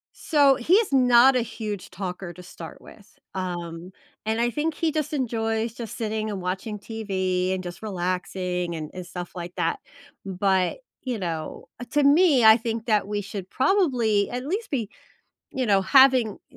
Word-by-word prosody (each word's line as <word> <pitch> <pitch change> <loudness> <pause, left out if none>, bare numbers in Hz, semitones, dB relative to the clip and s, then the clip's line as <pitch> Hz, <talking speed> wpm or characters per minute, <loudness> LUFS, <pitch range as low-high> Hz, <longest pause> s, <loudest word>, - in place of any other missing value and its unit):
So, 285 -4 +4
he's 360 - +2
not 255 0 +6
a 250 - +3
huge 210 -4 -5
talker 180 -2 -6
to 180 - -12
start 170 -2 -10
with, 205 - -17 0.2
um, 175 -1 -5 0.4
and 220 +1 0
I 240 +1 +1
think 305 +3 -1
he 325 -1 0
just 305 -2 -2
enjoys 225 -4 -1
just 235 -2 -7
sitting 220 -1 -2
and 200 -2 -4
watching 190 +4 -4
TV 190 -4 -2
and 185 0 -2
just 175 -1 -8
relaxing 180 -2 -2
and 155 -2 -6
and 180 -1 -7
stuff 175 0 -7
like 175 0 -7
that, 165 - -1 0.4
but, 190 -1 0 0.2
you 250 -3 -3
know, 165 -4 -5
uh, - - -5
to 295 -1 +3
me, 285 -3 +5
I 220 0 +9
think 225 -1 -4
that 210 -4 +1
we 205 0 -2
should 195 -1 -7
probably 250 - +2
at 250 +1 -4
least 400 +10 -3
be 235 -8 -2 0.7
you 255 - 0
know, 200 -2 +4
having 255 -1 +5
a 260 - -18
215 Hz, 175 wpm, -25 LUFS, 185-250 Hz, 0.7 s, I